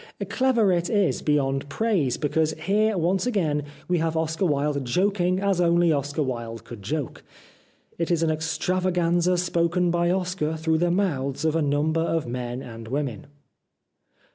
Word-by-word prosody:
Clever 235 -3 +2
it 175 -1 0
is 205 -5 +1
beyond 140 -2 0
praise, 185 - 0
because 155 +1 0
here 205 +6 +1
once 180 +5 +1
again 165 -11 0 0.3
we 180 -1 +1
have 160 0 -1
Oscar 160 +3 0
Wilde 145 -1 0
joking 185 +6 +1
as 195 -2 +1
only 170 -1 +4
Oscar 145 +1 -1
Wilde 115 -3 -5
could 115 -4 -10
joke. 140 +6 -4 0.8
It 170 - -1
is 170 -2 +2
an 160 - +2
extravaganza 175 +2 +1
spoken 175 0 +1
by 175 0 +1
Oscar 180 -4 -1
through 160 0 +1
the 175 +1 +2
mouths 155 -7 -1
of 160 0 +1
a 165 - +2
number 150 +3 +1
of 165 -1 0
men 125 +1 -4
and 115 -1 -9
women. 140 +2 -3
165 Hz, 155 wpm, -25 LUFS, 145-180 Hz, 0.8 s, only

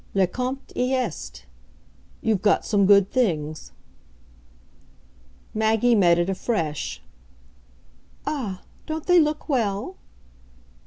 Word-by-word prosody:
"Le 195 -1 +4
compte 255 +8 -5
y 250 +1 0
est. 70 - -3 0.8
You've 215 -4 +1
got 205 -1 +2
some 200 -3 +2
good 200 -1 +5
things." 155 - -1 1.8
Maggie 220 +2 +2
met 175 -6 +4
it 175 0 +1
afresh 185 - -2 1.2
"Ah, 215 -11 -4 0.2
don't 315 -1 -4
they 360 -1 +5
look 305 -1 0
well?" 240 - -1
215 Hz, 100 wpm, -24 LUFS, 185-255 Hz, 1.8 s, good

